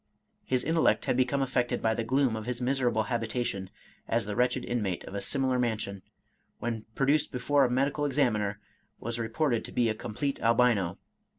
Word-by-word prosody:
His 130 -1 0
intellect 160 +1 +2
had - - +1
become 130 +2 +2
affected 125 -2 0
by 110 0 +1
the 115 - -2
gloom 130 0 +2
of 110 +1 -5
his 125 -1 -2
miserable 125 -3 +1
habitation, 115 -4 -2 0.4
as 115 -1 +1
the 105 0 -4
wretched 125 +1 +1
inmate 105 -7 -2
of - - -9
a 100 - -3
similar 130 +4 0
mansion, 110 -5 -1 0.6
when 115 -2 -4
produced 140 +2 +2
before 140 +2 +2
a - - 0
medical 140 +4 +1
ex 140 0 -4
aminer, 105 -7 +2 0.4
was 115 +1 -4
reported 115 +2 0
to - - -8
be 120 -2 +2
a - - +1
complete 120 +5 -3
Albino. 115 -6 +3
120 Hz, 180 wpm, -29 LUFS, 110-130 Hz, 0.6 s, Albino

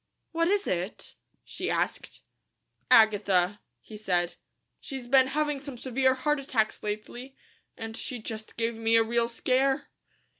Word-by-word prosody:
"What 330 0 +1
is 405 +2 +1
it?" 180 +3 -3 0.3
she - - -5
asked. - - -2 0.7
"Agatha," 205 -3 +4 0.2
he 215 - -11
said. 180 -4 0 0.5
"She's 265 -3 -7
been 260 +1 +5
having 295 +1 -1
some 275 -2 -8
severe 260 +1 +1
heart 295 +3 0
attacks 230 -5 -1
lately, 240 +5 -6 0.4
and 225 0 -6
she 250 - -5
just 220 -1 -8
gave 230 0 -1
me 225 0 +2
a 225 - +6
real 235 +1 0
scare." 265 +4 +1
235 Hz, 140 wpm, -28 LUFS, 215-270 Hz, 0.7 s, a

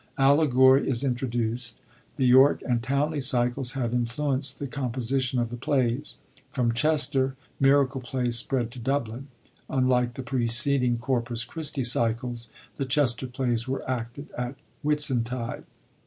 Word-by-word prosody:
* - - -35
Allegory 135 -1 +5
is 130 -1 0
intro 130 -1 -1
duced. 120 0 -2 0.4
The 135 - 0
York 130 +3 +5
and 120 -2 +1
Towneley 140 +5 0
cycles 125 0 +2
have 120 -3 -2
influenced 130 +3 -1
the 145 - -5
composition 130 -1 -2
of 120 -1 -1
the 120 - -5
plays. 130 +2 -1 0.3
From 120 -4 0
Chester, 140 -1 +1 0.2
miracle 135 -1 +3
plays 125 -1 -2
spread 120 -1 0
to 125 - -9
Dublin. 130 0 -2 0.4
Unlike 125 -2 +1
the 135 - -5
preceding 125 0 +2
Corpus 120 -1 -2
Christi 150 0 -2
cycles, 120 0 0 0.3
the 135 - -2
Chester 130 -2 +1
plays 125 -2 -1
were 135 +1 -3
acted 125 +3 -5
at 125 +2 -4 0.3
Whit 150 0 0
suntide. 125 -3 -2
130 Hz, 140 wpm, -26 LUFS, 120-135 Hz, 0.4 s, Allegory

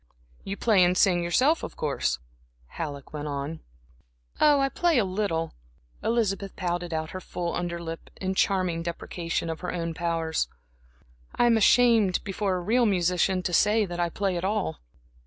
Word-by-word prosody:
"You 195 +1 -5
play 210 -6 +4
or 180 +1 +3
sing 180 -2 +4
yourself, 260 - +3
of - - -7
course?" 145 -3 0 0.5
Halleck 145 -4 -6
went 150 0 -4
on. 145 +2 -4 0.8
"Oh, 295 -2 +5
I 275 - +3
play 335 +2 +1
a 225 - +3
little," 185 -4 -2 0.5
Elizabeth 200 -4 0
pouted 175 -1 -2
out 160 0 -3
her 185 - -6
full 175 -1 -4
under 170 -1 -3
lip, 165 -1 -7
in 190 0 -2
charming 185 -4 +1
deprecation 170 0 -3
of 160 -1 -4
her 180 - -4
own 170 -2 -3
powers. 165 -1 -1 0.9
"I 240 - +3
am 235 -1 +5
ashamed, 225 -3 +4
before 195 -1 -1
a 180 - -2
real 235 +6 +3
musician, 180 0 +1
to 175 - -2
say 210 +4 +4
that 175 -2 -6
I 175 0 +1
play 190 +1 -1
at 170 - -4
all." 195 -4 -1
180 Hz, 170 wpm, -26 LUFS, 170-205 Hz, 0.9 s, Oh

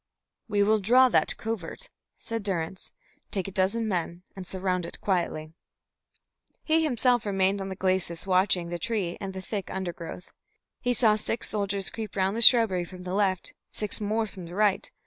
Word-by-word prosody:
"We 205 -2 +2
will 215 +1 +3
draw 250 +6 +5
that - - +2
covert," 225 - -5 0.2
said 230 0 -4
Durrance. 185 -3 -3 0.4
"Take 190 -2 -2
a - - -5
dozen 200 +4 +1
men 175 -2 -2
and 190 -2 -8
surround 185 -1 -1
it 170 - -6
quietly." 170 -5 -1 1.1
He 320 0 +3
himself 245 -4 +2
remained 195 -1 +1
on 195 - -4
the 190 - -5
glacis 185 -3 -1
watching 185 -2 +2
the 175 0 -4
tree 190 -3 -1
and 195 -1 -5
the 190 - -6
thick 200 -2 -4
undergrowth. 180 -1 -6 0.5
He 245 0 +1
saw 220 -4 +4
six 225 +2 -2
soldiers 200 -2 -1
creep 220 -3 -6
round 190 +1 +1
the 230 - -2
shrubbery 225 -7 +7
from 180 +1 -10
the 180 0 -4
left, 190 -2 0 0.2
six 210 0 -3
more 215 +2 0
from 190 -4 -9
the 175 - -9
right. 205 -1 +2
195 Hz, 175 wpm, -27 LUFS, 185-220 Hz, 1.1 s, shrubbery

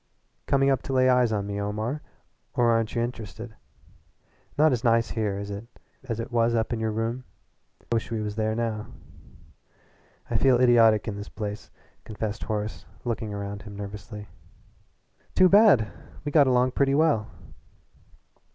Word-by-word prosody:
"Coming 140 0 +3
up 135 - +1
to 135 - -5
lay 130 0 +4
eyes 125 -2 +4
on 100 -2 -1
me, 100 0 -3
Omar, 110 +8 -3 0.5
or 120 -1 +3
aren't 115 0 0
you 115 - +1
int'rested? 115 -1 -6 1.0
Not 155 +1 +5
as 120 -3 -1
nice 115 -1 +2
here, 105 -3 -1
is 100 0 -5
it, 100 +3 -7 0.4
as 115 -4 -4
it 115 - -5
was 115 0 +2
up 110 +1 0
in 115 - -2
your 110 0 -1
room? 115 +3 -2 0.6
I - - -28
wish 115 - -1
we 115 -1 -2
was 105 -1 -4
there 110 0 0
now." 110 -2 -2 1.4
"I - - 0
feel 130 -3 +4
idiotic 115 -4 +5
in 100 -2 -3
this 105 +1 -7
place," 105 -1 -6 0.3
confessed 110 0 -5
Horace, 105 -1 -4 0.2
looking 115 -2 -2
round 100 0 -5
him 105 -1 -10
nervously. 105 +1 -8 1.1
"Too 185 0 +6
bad! 195 - +6 0.3
We 145 - -2
got 145 -2 +5
along 125 0 +3
pretty 135 +1 +2
well." 145 -8 +2
115 Hz, 160 wpm, -26 LUFS, 105-125 Hz, 1.4 s, Too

